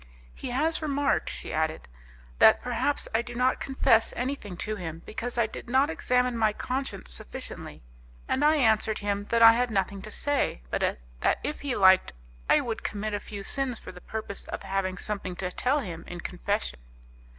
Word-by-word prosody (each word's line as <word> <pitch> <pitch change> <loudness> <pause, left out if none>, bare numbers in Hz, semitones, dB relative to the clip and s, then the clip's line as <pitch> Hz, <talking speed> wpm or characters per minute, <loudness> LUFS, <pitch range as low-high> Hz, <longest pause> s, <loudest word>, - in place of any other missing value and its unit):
"He - - -6
has 310 +7 +2
remarked," 285 -2 +1
she - - -5
added, 160 0 -1 0.5
"that - - +7
perhaps 290 - 0
I 225 - +3
do 240 0 -9
not 255 +2 +2
confess 230 -4 +2
anything 245 -8 -3
to 215 +4 -2
him 165 -4 -6
because 240 +2 -5
I 235 - +4
did 225 - -8
not 270 +5 +3
examine 250 -4 +1
my 215 -1 +3
conscience 255 -5 -3
sufficiently, - - -7 0.4
and 270 - +1
I 305 +1 +5
answered 220 -5 +3
him 205 -1 -2
that 230 +2 +3
I 225 0 +10
had 245 +1 +1
nothing 195 -2 -1
to 215 - -9
say, 280 - 0
but - - 0 0.2
that - - +2
if 300 - -3
he 280 -3 -2
liked 190 - +5 0.4
I - - +6
would 230 -2 -4
commit 215 0 -3
a 205 - 0
few 200 -1 -8
sins 265 +1 +1
for - - -9
the 180 -1 -13
purpose 220 -2 -4
of - - -6
having 190 -1 -1
something 195 -2 -3
to 180 0 -3
tell 275 +9 +1
him 170 -7 -6
in 175 -1 -7
confession." - - -2
220 Hz, 185 wpm, -27 LUFS, 195-255 Hz, 0.5 s, I